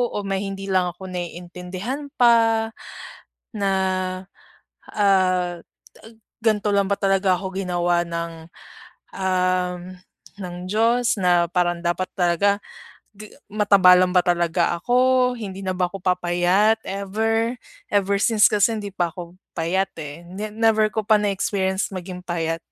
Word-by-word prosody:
o 205 - -2
may 195 0 -2
hindi 195 0 -6
lang 180 -1 +2
ako 190 +2 -11
naiintindihan 180 - -6
pa 225 -2 +4 0.9
na, 200 -2 -1 1.2
ah, 185 -4 +2 0.8
ganto 210 -2 +2
lang 200 -1 +2
ba 200 - +1
talaga 195 -1 +2
ako 190 +1 -6
ginawa 175 -2 0
ng, 170 -1 -6 0.7
um, 185 -1 0 0.6
ng 180 -2 -6
Diyos? 230 +4 +2
Na 175 -2 +3
parang 175 -1 0
dapat 175 +2 -1
talaga 195 +3 +1 0.5
ga 210 +1 -12 0.2
mataba 200 -3 +5
lang 180 0 +3
ba 180 -1 +2
talaga 175 0 +1
ako, 250 +5 +2
hindi 195 -3 -7
na 190 - -2
ba 180 -1 0
ako 185 +1 -9
papayat 180 +4 +2
ever? 220 +4 -1 0.3
Ever 200 -1 +1
since 215 0 +4
kasi 210 +2 +2
hindi 205 - -6
pa 180 -3 -1
ako 175 0 -9 0.2
payat, 180 +4 0
eh, 150 +4 -9
ne 200 +4 -6
never 220 0 +2
ko 215 -1 -3
pa 220 - +5
na 210 -1 +2
experience 190 0 -1
maging 180 0 -7
payat. 165 -1 -2
190 Hz, 135 wpm, -22 LUFS, 180-210 Hz, 1.2 s, mataba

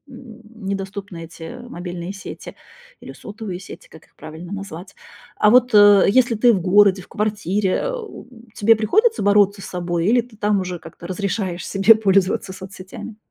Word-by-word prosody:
м, 225 -4 -14
недоступны 195 -3 -5
эти 165 +7 -10
мобильные 175 -2 -7
сети 195 - -10 0.5
или - - -10
сотовые 205 -4 -8
сети, - - -12
как 160 - -16
их - - -35
правильно 160 +4 -10
назвать. 195 -1 -8 0.4
А 210 - +3
вот, 250 0 +4
э, 205 -1 +7
если 245 +1 +3
ты 235 +2 +4
в 185 - -1
городе, 195 +1 +4
в - - -16
квартире, 210 -2 -1
а, - - -2
у, 440 - -10 0.3
тебе 225 +2 +4
приходится 435 - +1
бороться 200 0 +3
с - - -8
собой 175 -1 -3
или 240 +3 +3
ты 230 -3 -18
там 210 -1 +1
уже 180 -1 -5
как-то 170 - -12
разрешаешь 185 -1 -3
себе 195 +3 +5
пользоваться 195 -2 +1
соцсетями? 190 +3 -10
200 Hz, 165 wpm, -20 LUFS, 185-215 Hz, 0.5 s, э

